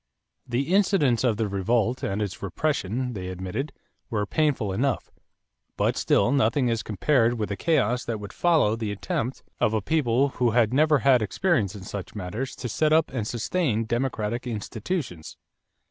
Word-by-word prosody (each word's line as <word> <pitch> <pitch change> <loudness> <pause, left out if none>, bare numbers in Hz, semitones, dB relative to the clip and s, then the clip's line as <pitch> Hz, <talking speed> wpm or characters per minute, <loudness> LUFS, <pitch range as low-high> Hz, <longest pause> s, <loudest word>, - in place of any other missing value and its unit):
The 135 +8 -1
incidents 185 - +3
of 115 -5 +2
the 110 -1 0
revolt 110 +5 0
and 100 +2 -1
its 100 -2 -5
repression, 125 -4 -1
they 95 -4 -5
admitted, 95 +10 -4 0.4
were 105 -4 -1
painful 135 -7 0
enough; 130 +4 -1 0.7
but - - +1
still 120 - +2
nothing 130 -1 +2
as 115 -1 0
compared 115 +3 +2
with 110 -3 -3
the 100 - -2
chaos 125 -4 +1
that 115 -2 -3
would 100 -1 -8
follow 160 -11 +3
the 110 -2 -3
attempt 110 +5 -3 0.2
of 110 - +2
a - - +2
people 140 -2 +2
who 125 -2 +1
had 115 -1 +3
never 150 +2 +4
had 130 -3 +6
experience 110 - 0
in 100 - -8
such 100 +1 -7
matters 105 +7 -4
to 125 - -5
set 155 +7 +1
up 160 0 +3
and 115 -5 -3
sustain 120 -1 0
democratic 120 0 -2
institutions. 110 - -4
120 Hz, 165 wpm, -25 LUFS, 105-140 Hz, 0.7 s, had